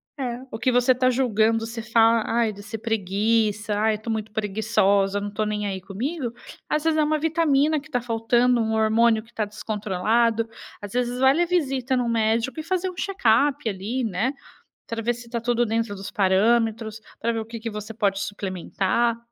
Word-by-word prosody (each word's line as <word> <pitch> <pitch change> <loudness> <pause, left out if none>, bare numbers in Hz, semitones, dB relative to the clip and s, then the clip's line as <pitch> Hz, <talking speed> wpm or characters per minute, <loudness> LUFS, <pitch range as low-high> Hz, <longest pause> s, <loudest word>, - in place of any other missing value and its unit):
é, 250 -4 -4
o 220 - -6
que 255 - +2
você 245 +1 +4
tá 255 0 +2
julgando, 225 -3 +2
você 230 0 -6
fala: 225 0 +3 0.2
"Aí", 220 -2 +1
de 205 - -11
ser 220 +2 -6
preguiça, 215 0 0
"Ai, 215 +1 +2
eu - - -8
tô 225 +1 -4
muito 220 -1 -3
preguiçosa, 205 -2 +1
não 205 0 -5
tô 215 +1 -1
nem 210 -1 -2
aí 190 -2 -3
comigo", 240 - -4 0.4
às 300 0 0
vezes 320 -1 +2
é - - +4
uma 305 +1 +1
vitamina 310 -1 +2
que 300 +3 -16
tá 250 -5 0
faltando, 240 +1 +2
um 220 0 -1
hormônio 220 0 +3
que 230 - -23
tá 220 - -1
descontrolado, 215 +2 0 0.3
às 205 -1 -8
vezes 245 0 -1
vale 265 +5 +4
a - - +3
visita 270 -7 0
no 245 -1 0
médico 230 +4 0
e - - -4
fazer 370 +2 -1
um - - -15
check-up 290 - +1
ali, 215 +6 -2
né, 220 +5 -1 0.6
pra 230 0 -3
ver 240 +2 +1
se 240 0 -11
tá 235 -1 -3
tudo 240 0 +1
dentro 225 -1 -1
dos 195 0 -7
parâmetros, 220 +3 +1 0.2
pra 230 - 0
ver 225 -1 -1
o - - -5
que 230 0 -8
que 230 - -4
você 210 +1 -6
pode 200 -3 0
suplementar. 200 +3 -1
225 Hz, 200 wpm, -24 LUFS, 215-250 Hz, 0.6 s, você